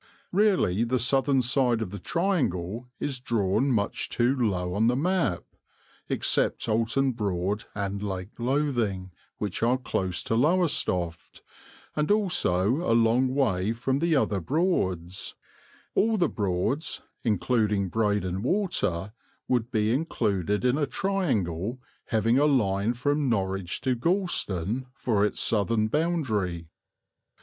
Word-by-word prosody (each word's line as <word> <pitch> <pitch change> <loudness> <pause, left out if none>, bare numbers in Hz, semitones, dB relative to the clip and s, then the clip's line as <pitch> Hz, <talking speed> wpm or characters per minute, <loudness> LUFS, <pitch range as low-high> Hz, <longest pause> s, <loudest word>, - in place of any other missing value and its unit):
Really 185 - +2
the 125 +2 +1
southern 135 +2 +2
side 125 -1 +2
of 110 -5 -4
the 100 - -6
triangle 125 - -1
is 135 -3 -3
drawn 115 +1 +1
much 105 -4 -1
too 125 +3 +1
low 95 -8 -1
on 110 +4 +2
the 120 - +3
map. 165 - 0 0.7
Except - - +1
Oulton 115 +5 +1
Broad 100 -2 -2
and 100 -1 -3
Lake 95 -1 -4
Lothing, 120 -8 -1 0.3
which 105 -4 -3
are 120 +3 +3
close 95 -7 -2
to - - -2
Lowestoft, 120 - 0 0.5
and 150 0 0
also 135 - +2
a 115 -9 +2
long 115 +3 +3
way 105 -6 +1
from 130 +3 -1
the 165 0 +2
other 105 -7 +1
Broads, 95 - -1 0.6
all 220 +1 +2
the 175 -4 +3
Broads, 105 - -1 0.2
including 105 -2 +1
Breydon 100 -4 0
Water, 120 - 0 0.3
would 120 -2 0
be 110 -2 +1
included 105 - -1
in 125 +4 +2
a 145 - +1
triangle 120 - -1 0.3
having 115 +3 +2
a 145 - +4
line 110 -6 +2
from 145 +3 0
Norwich 95 -4 -1
to 130 - +1
Gorleston 125 - 0
for 110 -6 +1
its 105 - 0
southern 110 0 +1
boundary. 110 - -1
115 Hz, 125 wpm, -27 LUFS, 100-135 Hz, 0.7 s, a